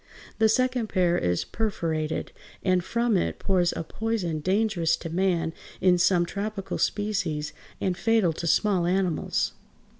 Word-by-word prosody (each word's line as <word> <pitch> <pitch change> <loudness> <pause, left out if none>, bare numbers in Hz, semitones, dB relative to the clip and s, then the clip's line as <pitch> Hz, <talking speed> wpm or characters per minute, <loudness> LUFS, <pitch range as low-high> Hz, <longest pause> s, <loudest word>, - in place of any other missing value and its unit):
The 220 0 +5
second 255 0 +1
pair 180 -4 +2
is 90 - 0
perforated, 165 -8 -2 0.3
and 185 -2 +2
from 235 +2 +1
it 180 - 0
pours 180 -3 +2
a - - -4
poison 190 -4 -2
dangerous 185 -1 +1
to 165 - -7
man 170 -2 +1 0.3
in 180 -1 +4
some 175 -1 +4
tropical 200 +2 -4
species 185 -8 -1 0.3
and 185 -2 0
fatal 220 -5 +2
to 170 - -4
small 185 -1 +2
animals. 180 -3 0
185 Hz, 140 wpm, -26 LUFS, 170-215 Hz, 0.3 s, The